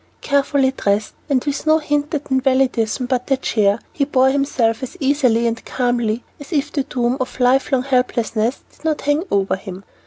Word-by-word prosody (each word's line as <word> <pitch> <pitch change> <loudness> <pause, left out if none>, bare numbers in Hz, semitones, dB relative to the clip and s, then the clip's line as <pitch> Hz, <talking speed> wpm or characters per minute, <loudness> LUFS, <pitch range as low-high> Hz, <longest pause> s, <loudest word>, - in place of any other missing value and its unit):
Carefully 280 -1 +2
dressed, 210 -4 -1 0.2
and 265 -3 +2
with 290 +1 -3
no 310 0 +6
hint 295 -1 -1
at 285 -1 -5
invalidism 260 -3 +1
but 250 -1 -1
the 270 - +2
chair, 210 -4 +1
he 285 - 0
bore 265 -2 +3
himself 265 -4 0
as 260 +8 -7
easily 265 -5 +2
and 230 -1 -1
calmly 240 -2 -1 0.2
as 285 - -11
if 295 -2 0
the 285 - 0
doom 250 -1 -1
of 255 0 -4
lifelong 255 +1 +2
helplessness 250 -3 0
did - - -24
not 315 -2 0
hang 290 +3 +1
over 195 -1 +1
him. 190 0 -9
260 Hz, 180 wpm, -19 LUFS, 235-280 Hz, 0.2 s, no